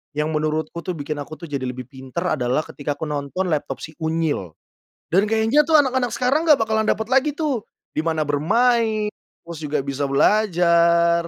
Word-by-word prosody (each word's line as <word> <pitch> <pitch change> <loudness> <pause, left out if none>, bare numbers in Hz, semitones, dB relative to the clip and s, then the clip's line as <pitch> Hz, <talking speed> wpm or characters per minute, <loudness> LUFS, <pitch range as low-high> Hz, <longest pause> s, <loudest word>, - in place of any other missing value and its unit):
yang 150 +1 0
menurutku 155 +1 -2
tuh 180 - -2
bikin 150 0 -4
aku 145 +2 -7
tuh 170 - -8
jadi 140 -2 -3
lebih 125 -1 -5
pinter 135 +6 -3
adalah 125 +4 +1
ketika 145 0 -4
aku 150 - -7
nonton 145 +6 -2
Laptop 140 -4 -2
Si - - -7
Unyil. 160 - -1 0.6
Dan 190 +5 +4
kayaknya 225 +6 +3
tuh 320 - +4
anak-anak 260 -4 +2
sekarang 280 +7 +1
nggak 300 -3 +7
bakalan 220 0 0
dapat 220 - +1
lagi 270 +3 +3
tuh, 295 -6 -1 0.3
dimana 160 0 0
bermain 215 - +2 0.3
terus 170 -2 -8
juga 150 -2 -1
bisa 140 +1 -2
belajar. 170 0 +3
170 Hz, 170 wpm, -22 LUFS, 145-220 Hz, 0.6 s, nggak